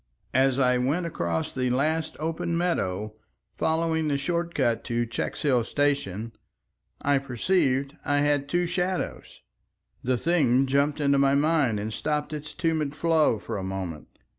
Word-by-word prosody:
As 130 0 +3
I 125 -2 +3
went 145 +8 0
across 85 - -2
the 130 -1 0
last 155 +5 0
open 165 +1 -2
meadow, 110 - -1 0.5
following 160 0 +1
the 145 -2 +1
short 170 +4 -2
cut 120 -5 +1
to 120 0 0
Checkshill 120 +2 0
station, 140 -6 -1 0.7
I 140 -1 +3
perceived 135 0 0
I 145 0 +1
had 145 -1 +1
two 175 +2 +1
shadows. 180 +1 -3 0.6
The 125 0 +1
thing 135 -4 +3
jumped 140 +3 +1
into 140 -1 +3
my 140 0 +4
mind 145 -7 +2
and 105 +1 -4
stopped 150 +5 -2
its 150 0 -6
tumid 155 -2 -1
flow 160 -7 +3
for 105 - -5
a - - -5
moment. 95 -5 -5
140 Hz, 145 wpm, -26 LUFS, 125-160 Hz, 0.7 s, my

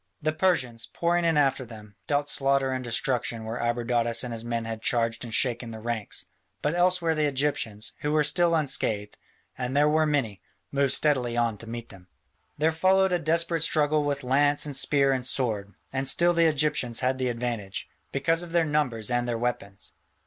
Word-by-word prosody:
The 155 +1 -1
Persians, 140 -10 0
pouring 170 0 +1
in 165 -2 +2
after 135 -2 +2
them, 105 -3 -12
dealt 145 0 0
slaughter 135 -1 +1
and 130 0 -3
destruction 120 -2 -1
where 115 +2 -4
Abradatas 120 0 +1
and 125 -2 -5
his 115 0 -3
men 115 -1 -3
had 115 -1 -5
charged 115 -1 +1
and 120 - -7
shaken 120 0 +1
the 110 -1 -8
ranks, 115 -2 -4 0.4
but 150 - +1
elsewhere 175 -1 +2
the 155 -1 +1
Egyptians, 130 -6 -2
who 150 - -2
were 155 0 +3
still 170 +2 +3
unscathed, 110 -9 -1 0.4
and 125 +2 -2
they 145 - +5
were 155 +1 +3
many, 120 - -1 0.3
moved 140 -1 +2
steadily 125 -6 +1
on 115 -2 +1
to 115 - -8
meet 120 0 -6
them. 95 -2 -15 0.5
There 155 +2 +2
followed 190 +3 +3
a 175 - +2
desperate 165 +1 +1
struggle 150 -1 +2
with 140 -1 -2
lance 145 +3 +2
and 145 -2 -4
spear 140 0 +3
and 130 -1 -2
sword, 110 -6 -1 0.2
and 135 0 -1
still 175 +5 +4
the 170 -1 +3
Egyptians 150 -6 +1
had 130 +1 0
the 130 -1 0
advantage, 115 -5 -4 0.2
because 165 +5 0
of 170 -1 -8
their 170 -1 +3
numbers 130 -8 -1
and 120 0 0
their 120 -1 -1
weapons. 115 -4 -3
130 Hz, 190 wpm, -26 LUFS, 115-150 Hz, 0.5 s, they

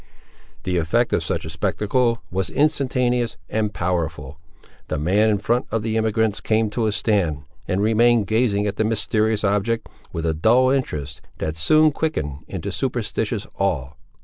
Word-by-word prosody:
The 90 -1 -1
effect 100 +9 +1
of - - +1
such - - -2
a - - -5
spectacle 115 +1 0
was 95 -1 -1
instantaneous 125 - +1
and 110 -1 0
powerful. 80 -6 -3 0.5
The - - -2
man 95 +9 +2
in 105 - +2
front 120 +5 0
of 110 0 -1
the 110 0 -1
emigrants 110 -2 +1
came 110 +1 +1
to 110 0 0
a - - +1
stand, 95 -9 0 0.2
and 95 0 0
remained 115 0 +4
gazing 105 -1 +1
at 105 0 -2
the 110 - +2
mysterious 110 0 0
object, 105 +3 0 0.2
with 85 0 -4
a 80 - +1
dull 120 +11 +4
interest, 75 - -2 0.2
that 80 0 -3
soon 155 - +4
quickened 140 - -2
into - - -5
superstitious - - -2
awe. 85 -10 0
105 Hz, 160 wpm, -22 LUFS, 90-115 Hz, 0.5 s, remained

